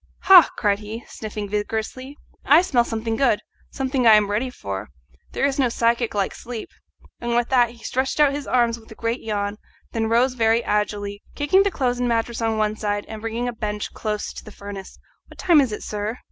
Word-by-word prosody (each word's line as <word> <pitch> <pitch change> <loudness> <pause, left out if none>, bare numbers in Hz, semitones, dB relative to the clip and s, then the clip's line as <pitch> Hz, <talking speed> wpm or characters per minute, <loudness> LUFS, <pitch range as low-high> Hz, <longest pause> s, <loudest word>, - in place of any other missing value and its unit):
"Ha!" 370 -3 +8
cried 205 -1 +1
he, 220 +2 -8
sniffing 210 -1 -6
vigorously, 220 +7 -4 0.3
"I 310 +6 +6
smell 245 -9 +2
something 225 -1 -3
good 245 -5 +3 0.3
something 265 -2 0
I 220 - +9
am 205 -1 +3
ready 230 +5 0
for. 100 - -6 0.4
There - - +1
is 280 0 0
no 255 -3 +3
physic 235 -1 +1
like 200 -2 0
sleep," 235 -2 -7 0.5
and 235 0 -2
with 240 0 +1
that 245 -3 +4
he 235 0 -15
stretched 265 +3 -1
out 295 -2 +6
his 285 -1 -5
arms 235 -2 +2
with 220 - -19
a - - -10
great 230 +3 -2
yawn, 205 -1 -2 0.3
then 225 -1 -1
rose 245 +3 +3
very 230 -1 +2
agilely, 205 -1 -1
kicking 295 +7 +3
the 400 - +2
clothes 250 -8 -1
and 245 -1 0
mattress 230 0 -1
on 225 -1 0
one 215 0 +1
side 205 -1 -2
and 220 -1 -8
bringing 230 +2 -3
a 245 - -3
bench 210 -2 -4
close 210 -1 -3
to - - -9
the 215 - -11
furnace. 200 -1 -9 0.3
"What - - -16
time 335 -5 +5
is 260 -5 0
it, 210 - -5
sir?" 210 +3 -4
230 Hz, 210 wpm, -23 LUFS, 210-250 Hz, 0.5 s, I